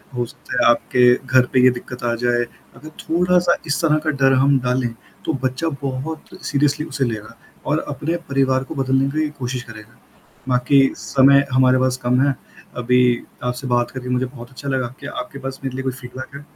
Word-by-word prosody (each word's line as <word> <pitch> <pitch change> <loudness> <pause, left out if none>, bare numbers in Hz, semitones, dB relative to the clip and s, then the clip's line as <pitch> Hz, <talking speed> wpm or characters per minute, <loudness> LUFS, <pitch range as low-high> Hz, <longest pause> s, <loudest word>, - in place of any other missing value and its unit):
हो 120 - 0
सकता - - -11
है - - +6
आपके 125 +1 +4
घर 130 -1 +2
पे 125 - +4
ये 130 - +8
दिक्कत 125 0 -8
आ 120 -1 +1
जाए।" 120 0 +2 0.3
अगर 145 +6 -11
थोड़ा-सा 175 +1 +2
इस 145 - 0
तरह 155 -2 +3
का - - +2
डर 135 0 +5
हम 135 +1 +4
डालें, 125 0 0 0.4
तो - - 0
बच्चा 130 +5 -1
बहुत 140 +4 -5
सीरियसली 145 +1 +1
उसे 135 - -2
लेगा 110 -2 -5 0.3
और - - +1
अपने 165 +3 -2
परिवार 135 -1 +2
को 160 - -8
बदलने 135 0 +1
की 155 0 0
कोशिश 125 0 -3
करेगा। 110 0 -13 0.5
बाकी 130 +2 +4 0.2
समय 140 +1 +4
हमारे 130 0 +5
पास 130 0 +1
कम 125 +1 +2
है, 140 -1 +2 0.4
अभी 125 0 +3 0.2
आपसे 125 +2 -3
बात 120 -1 +1
करके 125 -1 -6
मुझे 125 +1 +1
बहुत 120 -2 -10
अच्छा 140 +1 -6
लगा, 130 -2 0
क्या 145 - -7
आपके 140 - -7
पास 135 0 -6
मेरे 135 -1 -4
लिए 135 - -4
कोई 130 - -1
फ़ीडबैक 130 +2 -9
है? 140 +1 -10
130 Hz, 195 wpm, -20 LUFS, 125-140 Hz, 0.5 s, ये